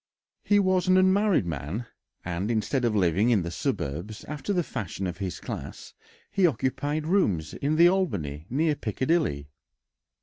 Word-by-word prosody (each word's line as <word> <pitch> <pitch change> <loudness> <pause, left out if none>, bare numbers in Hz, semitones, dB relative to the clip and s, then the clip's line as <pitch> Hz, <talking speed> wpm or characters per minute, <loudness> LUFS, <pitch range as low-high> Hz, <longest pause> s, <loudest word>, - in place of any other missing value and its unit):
He 205 - +3
was 185 -2 +2
an 185 0 +5
unmarried 190 - +3
man, 85 - -4 0.4
and 90 +4 -2
instead 120 +3 0
of 115 -2 +1
living 95 +3 +3
in 105 -7 +3
the 85 - -4
suburbs, 85 +7 -3
after 150 +6 -4
the 180 -3 +1
fashion 100 - -5
of 90 0 -4
his 95 -4 -4
class, - - -7 0.4
he 195 -3 +4
occupied 145 +1 -1
rooms 105 - +1
in 145 +3 -1
the 170 +2 +7
Albany, 95 - -1
near 150 +5 +2
Piccadilly. 120 - -1
120 Hz, 155 wpm, -27 LUFS, -, 0.4 s, the